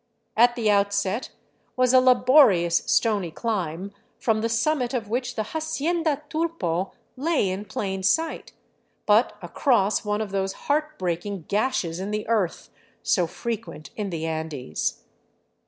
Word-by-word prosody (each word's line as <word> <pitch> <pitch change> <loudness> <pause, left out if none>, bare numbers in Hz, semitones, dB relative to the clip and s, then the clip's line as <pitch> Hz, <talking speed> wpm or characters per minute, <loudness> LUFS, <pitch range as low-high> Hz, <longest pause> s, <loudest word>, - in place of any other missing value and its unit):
At 240 +2 +5
the 230 -3 -1
outset 200 +2 +1 0.5
was 255 0 +3
a 260 - +8
la 255 0 +6
borious, 200 - +4
stony 205 -6 +2
climb, 190 -2 -3 0.3
from 220 -2 +1
the 230 - 0
summit 250 +2 0
of 225 -4 -3
which 245 +1 -2
the 220 - -1
" - - -12
Hacienda 315 -1 -1
Tulpo 300 - -2
" - - -42
lay 290 - +1
in 190 +3 -3
plain 195 -2 -3
sight, 320 +12 0 0.5
but 215 +4 +3
across 215 -7 +1
one 210 0 -1
of 215 -3 -3
those 195 0 -1
heartbreaking 200 - -2
gashes 200 -6 0
in 195 +2 -4
the 210 0 -3
earth 215 -6 -1 0.3
so 180 -7 +2
frequent 165 -8 -6
in 210 -2 -3
the 165 -3 -3
Andes. 155 - -3
210 Hz, 145 wpm, -25 LUFS, 190-255 Hz, 0.5 s, a